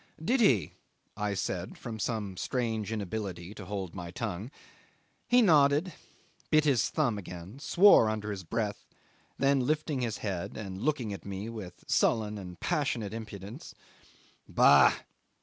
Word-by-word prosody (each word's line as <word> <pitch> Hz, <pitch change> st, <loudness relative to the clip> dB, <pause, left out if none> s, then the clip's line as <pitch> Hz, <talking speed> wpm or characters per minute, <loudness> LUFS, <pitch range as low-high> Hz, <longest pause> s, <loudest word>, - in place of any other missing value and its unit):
"Did 235 Hz, +11 st, +1 dB
he?" 110 Hz, -, +3 dB, 0.4 s
I 105 Hz, -1 st, -2 dB
said -, -, -3 dB
from 115 Hz, -2 st, -7 dB
some 105 Hz, -4 st, -2 dB
strange 110 Hz, -1 st, -2 dB
inability 100 Hz, -3 st, -4 dB
to 100 Hz, -, -9 dB
hold 95 Hz, -3 st, -4 dB
my 90 Hz, -3 st, -6 dB
tongue. 90 Hz, +5 st, -4 dB, 0.8 s
He 245 Hz, 0 st, +5 dB
nodded, 150 Hz, -1 st, +4 dB, 0.6 s
bit 155 Hz, -1 st, +5 dB
his 130 Hz, -9 st, +3 dB
thumb 120 Hz, -10 st, 0 dB
again, 90 Hz, +5 st, -9 dB
swore 175 Hz, -, +6 dB
under 105 Hz, -1 st, -3 dB
his 95 Hz, -2 st, -5 dB
breath: 105 Hz, +3 st, -3 dB, 0.5 s
then 140 Hz, 0 st, +3 dB
lifting 155 Hz, -2 st, 0 dB
his 115 Hz, -4 st, -2 dB
head 95 Hz, -4 st, -3 dB
and 95 Hz, -2 st, -6 dB
looking 125 Hz, -6 st, -1 dB
at 100 Hz, -, -8 dB
me 100 Hz, +2 st, -5 dB
with 105 Hz, -6 st, -9 dB
sullen 105 Hz, -2 st, +1 dB
and 90 Hz, -2 st, -9 dB
passionate 120 Hz, -8 st, -1 dB
impudence 110 Hz, -, -8 dB, 0.7 s
"Bah! 70 Hz, -1 st, +7 dB
110 Hz, 140 wpm, -30 LUFS, 100-135 Hz, 0.8 s, Bah